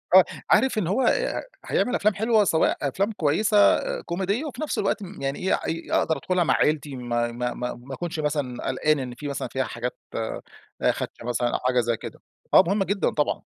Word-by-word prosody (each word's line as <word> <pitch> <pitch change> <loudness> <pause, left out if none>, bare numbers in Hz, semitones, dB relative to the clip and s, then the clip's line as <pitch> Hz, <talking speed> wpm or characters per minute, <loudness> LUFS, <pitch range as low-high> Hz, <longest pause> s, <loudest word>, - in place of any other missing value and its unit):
آه، - - +10 0.3
عارف 265 -3 +4
إن 200 -6 0
هو 200 +9 +1
آآ - - +1 0.2
هيعمل 250 - +1
أفلام 215 +1 +2
حلوة 220 +1 +3
سواء 165 -4 +2
أفلام 195 +10 0
كويسة 205 +4 +1 0.4
كوميدية، 195 - -2
وفي 300 0 -6
نفس 310 - -2
الوقت 200 +1 0
م 190 -4 -9
يعني 135 +1 -2
إيه 190 - +1
اي 165 +1 -3
أقدر 160 -2 +2
أدخلها 180 +5 +1
مع - - +2
عيلتي 150 -2 +1
ما 120 -1 -1
ما 120 +1 -2
ما 125 - -4
ما 125 +3 -10
أكونش 165 +3 -4
مثلًا 145 -5 -2
قلقان 150 +3 +1
إن 125 -2 -5
في 145 +4 -6
مثلًا 140 - -3
فيها 130 - -1
حاجات 125 0 -4 0.2
آآ 110 - -3 0.5
خادشة - - -6
مثلًا 120 0 0
أو - - 0
حاجة 125 0 +2
زي 120 -1 0
كده، - - -9 0.3
آه - - +9
مهم 200 +2 +2
جدًا 195 -2 0
طبعًا. 150 - -1
155 Hz, 205 wpm, -25 LUFS, 125-200 Hz, 0.5 s, آه